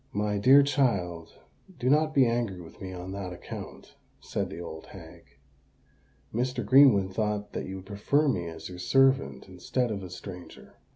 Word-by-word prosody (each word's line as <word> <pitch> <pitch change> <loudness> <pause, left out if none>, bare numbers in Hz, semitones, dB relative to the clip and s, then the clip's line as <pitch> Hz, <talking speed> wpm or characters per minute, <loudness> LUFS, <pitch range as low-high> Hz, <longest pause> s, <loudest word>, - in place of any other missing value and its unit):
"My 105 0 0
dear 135 +7 +7
child, 100 - -1 0.4
do 125 - -3
not 155 +3 +3
be 135 -2 +6
angry 115 -5 -1
with 85 -2 -13
me 95 -1 -6
on 90 0 -7
that 95 -2 -5
account," 90 - -9 0.3
said - - -3
the - - -8
old 80 -2 -8
hag. - - -13 1.1
"Mr. 125 +3 -1
Greenwood 120 -9 +6
thought 105 0 -2
that - - -4
you 95 - -6
would 95 -1 -9
prefer 105 +10 +1
me 90 -11 0
as 80 -1 -8
your 90 -1 -9
servant 135 +9 +2
instead 105 +7 -2
of 100 -2 -3
a 90 - -8
stranger." 90 0 -10
100 Hz, 170 wpm, -28 LUFS, 90-130 Hz, 1.1 s, dear